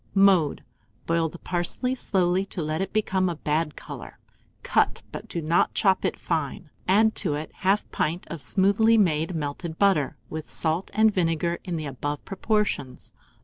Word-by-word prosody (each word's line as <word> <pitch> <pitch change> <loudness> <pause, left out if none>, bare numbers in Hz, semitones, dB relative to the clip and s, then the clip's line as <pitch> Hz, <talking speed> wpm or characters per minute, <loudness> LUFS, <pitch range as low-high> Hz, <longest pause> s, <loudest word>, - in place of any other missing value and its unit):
Mode. 195 -6 +4 0.4
Boil 165 -1 +1
the 175 - -10
parsley 180 +10 -1
slowly 185 -6 +1
to 175 - -4
let 155 +3 -2
it 195 - -3
become 190 -3 +1
a 170 - -3
bad 150 0 -1
colour; - - -9 0.5
cut, - - +1
but - - -7
do 170 - -4
not 165 +3 +2
chop 190 -3 +3
it - - 0
fine. 155 -1 -3 0.2
Add 215 +4 +5
it - - -15
to 185 - +2
1/2 185 +7 0
pint 165 +4 -1
of 165 -3 -6
smoothly 205 +6 +3
made 165 -3 +2
melted 160 +2 -4
butter, 190 -9 +2
with 155 0 -6
salt 160 +3 -1
and 220 0 +5
vinegar 170 -1 0
in 180 -3 -3
the 155 - -4
above 145 +2 -4
proportions. 195 - -2
175 Hz, 165 wpm, -25 LUFS, 155-195 Hz, 0.5 s, Add